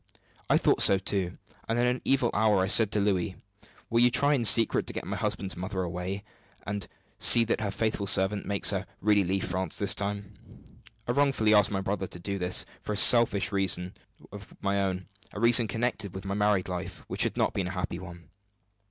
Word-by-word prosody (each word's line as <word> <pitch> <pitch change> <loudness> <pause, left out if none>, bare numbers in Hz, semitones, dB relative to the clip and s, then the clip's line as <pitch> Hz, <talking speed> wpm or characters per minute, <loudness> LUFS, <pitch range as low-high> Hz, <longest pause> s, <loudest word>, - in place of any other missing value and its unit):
I - - +4
thought - - +1
so 100 - +7
too; 95 -2 -3 0.3
and 115 - -1
in 120 - +1
an 125 +1 -1
evil 130 -3 +1
hour 105 -2 +2
I - - +1
said 105 +1 +4
to 105 - 0
Louis: 95 -3 -1 0.6
'Will 115 - +2
you 120 +1 +5
try 140 +4 +1
in 125 -5 -1
secret 115 +2 +4
to - - -3
get - - -6
my - - -5
husband's 95 +1 -3
mother 95 +1 -5
away, 90 +3 -5 0.4
and 100 -2 -4 0.3
see 120 - +7
that 115 -1 -2
her 105 - -2
faithful 110 0 -3
servant 95 +2 +3
makes 100 0 +2
her 100 0 -4
really 105 -1 +2
leave 95 +1 -2
France 95 +1 -3
this 100 - +3
time?' 100 0 -5 0.7
I - - 0
wrongly 135 -6 +1
asked 105 -2 +4
my 95 -2 -3
brother 95 0 -4
to - - -11
do 100 +3 -5
this 90 -1 0 0.2
for 105 - -5
a - - -4
selfish 110 -3 +5
reason 95 -2 0 0.4
of 105 0 -12
my 100 0 -1
own 95 -1 -3 0.3
a - - -7
reason 115 0 +5
connected 110 -3 -3
with 95 +1 -8
my 95 - -4
married 105 -2 0
life, 90 -1 -7
which - - -2
has - - +1
not - - 0
been 95 -2 -3
a 90 +1 -7
happy 90 -1 -4
one. 85 -2 -13
100 Hz, 210 wpm, -27 LUFS, 95-110 Hz, 0.7 s, so